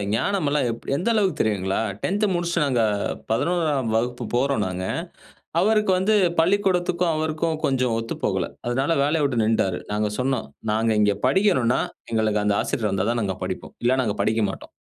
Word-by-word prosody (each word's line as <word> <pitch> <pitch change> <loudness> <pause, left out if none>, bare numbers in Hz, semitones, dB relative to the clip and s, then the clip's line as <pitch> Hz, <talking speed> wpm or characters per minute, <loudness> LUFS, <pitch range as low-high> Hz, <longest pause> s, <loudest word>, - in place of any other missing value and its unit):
ஞானமல்லாம் 150 - 0 0.3
எந்த 185 +10 0
அளவுக்கு 200 -4 +1
தெரியுங்களா? 95 -3 0 0.2
10 205 +2 0
முடிச்சிட்டு 170 -2 0
நாங்க 125 -4 +1 0.5
11 160 +3 +1
ஆம் 110 -1 -2
வகுப்பு 120 +1 -1
போறோம் 135 -3 +1
நாங்க. 90 0 -4 0.8
அவருக்கு 215 0 +3
வந்து 210 +4 +2 0.2
பள்ளிக்கூடத்திற்கும் 180 -2 +2
அவருக்கும் 155 0 -1
கொஞ்சம் 130 -4 +1
ஒத்து 115 - -4
போகல. - - 0 0.2
அதனால 135 +6 +1
வேலையை 150 +2 +1
விட்டு 120 -5 +1
நின்னுட்டாரு. 105 -5 +1
நாங்க 105 0 0
சொன்னோம், 130 +1 0 0.3
"நாங்க 110 +1 +1
இங்கே 105 -1 +3
படிக்கணும்னா, 130 - +3 0.3
எங்களுக்கு 110 -2 +1
அந்த 105 -1 +2
ஆசிரியர் 105 -4 -1
வந்தா 95 +2 0
தான் 120 -1 -1
நாங்க 95 -3 -2
படிப்போம். - - -6
இல்ல 130 +2 +3
நாங்க 105 -4 -1
படிக்க 110 0 +1
மாட்டோம்." - - -8
130 Hz, 160 wpm, -23 LUFS, 110-170 Hz, 0.8 s, அவருக்கு